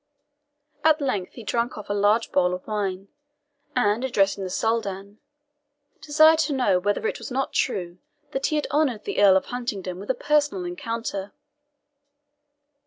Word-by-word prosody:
At 315 0 +5
length 210 -10 -2
he 235 - -10
drank 235 +3 -1
off 210 - -8
a 205 - -1
large 205 +3 +2
bowl 180 -1 +2
of 180 - -10
wine, 195 -2 -3 0.7
and 230 -1 +2
addressing 200 -6 +1
the 185 - -4
Soldan, 200 -1 -2 0.8
desired 315 +1 +5
to 305 -2 +1
know 225 -9 +2
whether 205 - -1
it 450 - -1
was - - -7
not 270 +1 -2
true 180 -7 -1 0.3
that 270 +1 -1
he 305 - -1
had 300 - 0
honoured 285 -7 +1
the - - -1
Earl 195 -2 +7
of - - -2
Huntingdon 200 -7 -4
with 200 - -10
a 260 - +2
personal 290 -10 +1
encounter. 200 +1 -4
210 Hz, 160 wpm, -24 LUFS, 195-265 Hz, 0.8 s, Earl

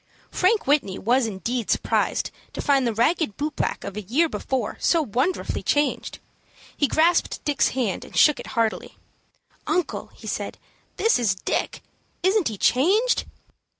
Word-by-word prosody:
Frank 410 +4 +2
Whitney 275 -10 +1
was 245 +3 +2
indeed 225 +3 -3
surprised - - 0 0.2
to - - -4
find 275 -3 +3
the 230 - 0
ragged 240 - +1
boot 300 +2 -3
black - - -2
of 200 - -6
a 210 - -4
year 260 - +1
before 265 -6 -3
so 335 -2 +2
wonderfully 260 - -1
changed. 290 0 0 0.6
He 285 - +2
grasped 335 +4 +1
Dick's 290 -2 +2
hand, 225 -8 -1
and - - -9
shook 300 - +5
it - - -8
heartily. 225 -1 -1 0.7
"Uncle," 360 -2 -1
he - - -14
said, - - -4 0.4
"this 450 - +3
is 215 -5 +1
Dick. 185 - -3 0.4
Isn't 385 0 +3
he 220 -3 -4
changed?" 390 - +2
270 Hz, 150 wpm, -24 LUFS, 225-335 Hz, 0.7 s, shook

